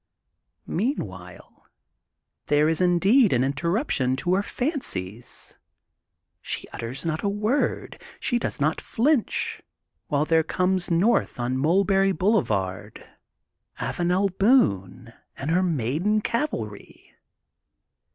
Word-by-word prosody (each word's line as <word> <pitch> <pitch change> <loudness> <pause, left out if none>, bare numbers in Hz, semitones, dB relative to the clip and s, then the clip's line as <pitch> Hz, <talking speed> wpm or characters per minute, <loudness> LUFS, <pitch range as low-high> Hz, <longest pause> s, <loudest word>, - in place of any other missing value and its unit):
Meanwhile 95 - -5 0.8
there 150 +1 +3
is 160 +2 0
indeed 190 +7 +4
an 125 0 +2
interrup 170 - -1
tion 130 -1 +1
to 175 +7 -1
her 190 - +3
fancies, 125 - -5 0.8
she - - -4
utters 125 +7 -6
not 160 -1 -1
a 200 - 0
word, 210 +7 -1 0.2
she 245 - 0
does - - -3
not 155 +2 0
flinch, 265 +1 0 0.5
while 145 0 +1
there 160 0 +3
comes 185 +3 0
north 180 - +2
on 120 +1 -1
Mulberry 195 +7 +3
Boulevard 110 - -1 0.7
Avanel 180 +2 0
Boone 120 - +2 0.2
and 145 +4 -3
her 180 +2 +3
maiden 165 - 0
cavalry. 205 - -4
170 Hz, 105 wpm, -25 LUFS, 130-205 Hz, 0.8 s, indeed